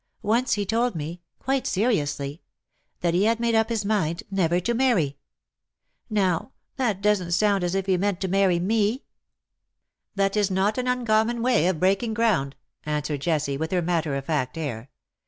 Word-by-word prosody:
Once 230 +3 +1
lie 205 - 0
told 230 +2 0
me 165 +3 -5
— - - -54
quite 270 0 0
seriously 150 - -1 0.3
— - - -48
that 170 -1 +1
he 185 +4 +3
had 225 +1 +2
made 235 0 +1
up 225 0 +3
his 220 -3 -1
mind 175 -6 0
never 175 -3 +2
to 235 +7 -1
marry. 230 - +2 0.9
Now, 195 +2 0 0.2
that 220 -7 -1
doesn't 195 -5 +1
sound 200 0 +2
as 175 +1 -1
if 195 -1 0
he 190 -2 +2
meant 195 0 0
to 190 - 0
marry 190 -1 +3
me.'' 215 +7 0 1.1
"That 195 0 +1
is 205 -2 +2
not 195 +5 +1
an 250 - -2
uncommon 235 -1 +1
way 240 -9 +3
of 185 -4 0
breaking 195 +5 +1
ground/' 200 -13 +1 0.3
answered 150 -1 -2
Jessie, 150 -3 0
with 160 +2 -3
her 180 -2 +1
matter 165 -4 0
of 135 -1 -4
fact 135 -3 -1
air. 135 -6 -5
195 Hz, 180 wpm, -25 LUFS, 165-220 Hz, 1.1 s, he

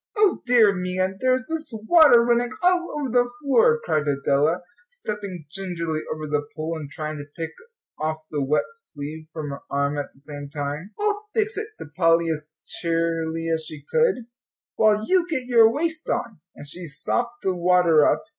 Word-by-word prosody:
"O 415 -3 +3
dear 230 -5 +6
me, 180 -1 -3
and 190 +1 0
there's 255 0 +2
this 320 -2 -4 0.2
water 310 -9 +7
running 240 0 +2
all 355 -2 +2
over 290 -2 -2
the 245 0 +3
floor," 460 - +4
cried 150 -1 0
Adela, 145 +4 +1 0.3
stepping 210 - -6
gingerly 170 -5 -3
over 155 0 -4
the 145 -1 0
pool, 160 +1 -3
and 150 -3 -6
trying 155 0 -5
to 145 - -7
pick 165 -1 -3 0.5
off 155 +1 -1
the 150 -2 -1
wet 140 +3 +2
sleeve 155 - -8
from 155 -3 -5
her 140 - -6
arm 140 +1 0
at 145 - -5
the - - -17
same 145 0 -7
time. 145 +6 -5
"I'll 420 0 -1
fix 435 0 +1
it," 425 +1 -3
said 145 - -10
Polly, 165 -1 +3
as 155 0 -5
cheerily 165 -1 -1
as 160 0 -1
she 155 -2 -8
could, 455 - +2 0.5
"while 215 0 +3
you 365 -2 +3
get 280 -6 0
your 230 -3 +6
waist 320 +4 -2
on." 220 -7 -2 0.2
And - - -10
she 170 +4 -6
sopped 240 - -2
the 190 - +1
water 175 -3 +4
up. - - +2
180 Hz, 185 wpm, -24 LUFS, 155-250 Hz, 0.5 s, water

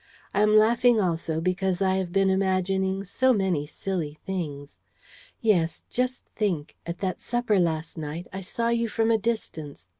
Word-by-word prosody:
I 205 - +2
am 210 0 +5
laughing 235 +2 +5
also 165 -4 0
because 185 +1 0
I 190 -1 +2
have 185 -2 -2
been 195 +1 +3
imagining 190 0 +1
so 260 +7 +2
many 185 -8 0
silly 160 -4 -4
things. 150 -7 -5 0.6
Yes, 170 -7 +2
just 255 +1 -1
think, 175 -9 -1
at 170 +1 -3
that 185 -2 -2
supper 240 -4 +1
last 160 -1 -1
night, 155 +3 -5
I 190 - -4
saw 230 +5 -2
you 235 0 +1
from 225 +1 +1
a 225 - +3
distance 160 - -4
190 Hz, 160 wpm, -26 LUFS, 170-215 Hz, 0.6 s, am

